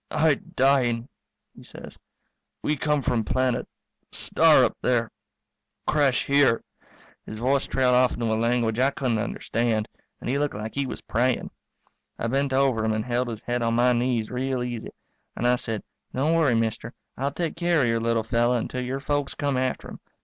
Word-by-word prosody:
"I 160 -1 +3
dying," 130 -3 +1 0.5
he - - -14
says. - - -11 0.7
"We 150 - +1
come 150 -1 0
from 120 -2 +1
planet 130 +2 0 0.4
star - - +4
up - - -2
there 120 -2 +1 0.7
crash 140 -4 +2
here 140 -4 +3 0.3
" - - -28
His 110 - -6
voice 130 +4 +1
trailed 130 -1 +2
off 125 0 +4
into 120 - -3
a 110 - +1
language 115 0 +1
I 130 +2 +4
couldn't 125 -5 -1
understand, 115 -1 -1 0.3
and - - -7
he 135 +3 0
looked 145 0 -1
like 110 +1 -5
he 140 -1 -1
was - - -6
praying. 125 +2 0 0.7
I - - -3
bent 135 +3 0
over 130 -4 +2
him 110 0 +1
and 110 0 -2
held 125 0 0
his 115 -2 -6
head 120 0 -2
on 115 0 +1
my 125 +1 +4
knees 120 -2 0
real 130 0 -1
easy, 120 -2 -5 0.5
and 120 - -3
I 125 - +4
said, 115 -3 -4 0.3
"Don't 145 +5 +2
worry, 155 -7 +3
mister, 115 +1 -2 0.2
I'll 135 +2 -1
take 165 +3 -3
care 170 -4 +2
of - - +2
your 115 0 +1
little 115 -1 +1
fellow 120 +2 +2
until 125 +2 -3
your 130 +2 -3
folks 145 -1 -1
come 140 -2 -1
after 130 0 -1
him. - - -10
125 Hz, 185 wpm, -25 LUFS, 115-135 Hz, 0.7 s, star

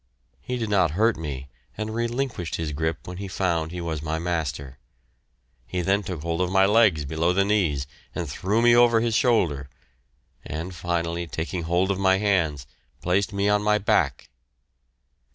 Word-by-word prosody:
He 125 - -3
did 110 -3 -3
not 95 -5 +4
hurt 110 +1 +3
me, 70 -4 -6 0.3
and 110 +1 -3
relinquished 120 - -2
his 80 -2 -3
grip 80 +2 -3
when 90 0 -6
he 100 +1 -5
found 85 -4 -1
he 90 +1 -6
was 80 -3 -3
my 80 +1 -2
master. 75 -6 -3 0.9
He 90 - -2
then 100 +3 +2
took 90 -6 -6
hold 85 +1 -1
of 90 0 0
my 95 0 +5
legs 100 -8 +4
below 80 +5 0
the 100 +2 +2
knees 90 -10 +1 0.3
and 85 - -3
threw 100 +10 0
me 120 0 +6
over 120 -1 +5
his 115 0 0
shoulder, 85 - +2 0.7
and 80 +5 -5
finally, 85 0 -2
taking 85 +2 -4
hold 90 +3 +1
of 95 - -2
my 95 -1 +4
hands, 85 -10 0 0.4
placed 95 +3 +1
me 100 0 0
on 105 0 +3
my 105 0 +3
back. 80 -9 0
90 Hz, 170 wpm, -25 LUFS, 80-105 Hz, 0.9 s, me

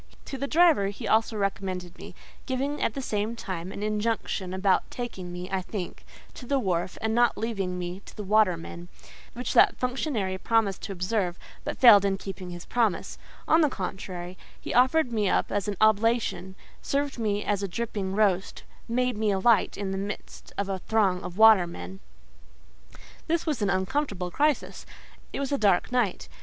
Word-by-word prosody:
To - - -6
the 280 - -2
driver 320 - +4
he 200 - -5
also 220 0 +2
recommended 190 -3 -3
me, - - -10 0.3
giving 275 +2 -2
at - - 0
the 270 - -4
same 215 0 -2
time 185 -5 -5
an 200 - -6
injunction 210 -3 -1
about 190 0 +1
taking 190 -8 -6
me, 180 +1 -6
I 190 -1 0
think, 185 -1 -6 0.3
to 245 - -10
the 280 - +2
wharf, 185 -6 -1
and 220 0 +1
not 240 +1 +3
leaving 195 -5 -2
me 180 +1 -5
to - - -12
the 210 - -4
watermen; 185 -4 +1 0.5
which 245 +2 -4
that 395 0 +5
functionary 250 -7 -2
promised 220 -4 +1
to - - -5
observe, 180 -1 -1 0.3
but - - -4
failed 220 -6 +8
in 195 -1 +1
keeping 190 -2 -7
his 175 -1 -8
promise: 230 -5 -1 0.3
on 320 - +5
the 300 - +4
contrary, 185 -3 -6 0.2
he - - -5
offered 255 +2 +4
me 210 -3 +1
up - - +1
as 205 -1 -1
an 205 -2 -2
oblation, 215 -3 +2 0.3
served 280 -2 -1
me 210 -2 0
as 205 -1 0
a 200 - -1
dripping 195 -1 -3
roast, 200 -3 +1 0.2
making 250 -1 0
me 215 -1 +1
alight 205 +3 +3
in 200 -1 -3
the 195 - -2
midst 200 +1 -7
of 200 - -1
a 195 -1 -2
throng 195 -3 +1
of 180 - -7
watermen. 175 - +4 1.3
This 335 +1 0
was 300 -8 -1
an 205 - +1
uncomfortable 190 -2 -1
crisis. 295 - 0 0.5
It - - -4
was 275 -1 -2
a 280 - +1
dark 200 -1 +2
night. 245 -7 0
205 Hz, 175 wpm, -27 LUFS, 185-235 Hz, 1.3 s, failed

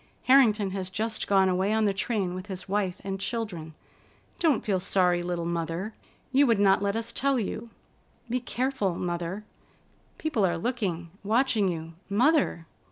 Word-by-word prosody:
Harrington 220 -7 +5
has 190 -1 -4
just 220 +4 -2
gone 195 -1 +4
away 185 +2 +1
on 220 0 +2
the 200 - +2
train 195 -2 -1
with 185 +2 -6
his 190 -2 -6
wife 195 -2 -1
and 195 0 -4
children. 190 -8 -4 0.6
Don't 300 -9 +2
feel 195 -4 +1
sorry, 180 -1 +2
little 175 -1 -2
Mother. 170 +4 -3 0.4
You 275 +2 +5
would 230 -3 +4
not 195 -1 +4
let 200 0 0
us 230 +1 -2
tell 270 +2 +1
you. 230 +2 -4 0.6
Be 245 +2 0
careful, 245 -6 -1
Mother; 175 +3 -3 0.7
people 305 -10 0
are 175 -3 +2
looking, 180 -6 -2
watching 220 -1 +2
you. 165 -2 -4 0.2
Mother!" 245 - +2
200 Hz, 160 wpm, -27 LUFS, 180-230 Hz, 0.7 s, Harrington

